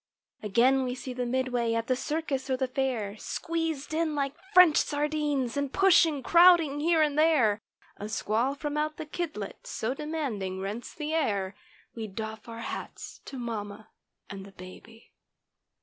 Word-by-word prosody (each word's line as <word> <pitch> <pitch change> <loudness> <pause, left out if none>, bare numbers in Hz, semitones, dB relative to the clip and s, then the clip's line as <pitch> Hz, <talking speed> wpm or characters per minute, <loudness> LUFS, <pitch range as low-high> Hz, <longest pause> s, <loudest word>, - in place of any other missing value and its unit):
Again 245 +6 +3
we 250 -1 -2
see 255 0 -6
the 250 0 -3
"midway" 245 -2 0
at 230 0 -1
the 255 - +1
circus 280 -1 -3
or 260 - +1
the 260 0 0
fair 250 -6 -2
Squeezed 325 +1 -3
in 315 -1 0
like 275 -1 -1 0.2
French 365 -6 +7
sardines 295 -4 0
and 285 -1 -1
pushing, 330 -7 +4
crowd¬ 345 +4 +7
ing 290 -3 -3
here 320 +1 +3
and 300 -1 0
there; 250 -10 +3 0.4
A 210 - -6
squall 225 +5 0
from 295 +1 -4
out 305 0 -1
the 315 - -5
"kidlet" 300 - -5
so 225 +4 -2
demanding 275 -11 -3
rents 205 +5 -5
the 305 0 -4
air— 200 -11 0 0.4
We 225 -2 -5
doff 220 +2 -7
our 230 0 -7
hats - - -7
to 270 - -8
mamma 215 -3 -5 0.4
and 195 -1 -8
the 195 0 -13
baby. 190 +5 -13
260 Hz, 165 wpm, -28 LUFS, 220-305 Hz, 0.4 s, French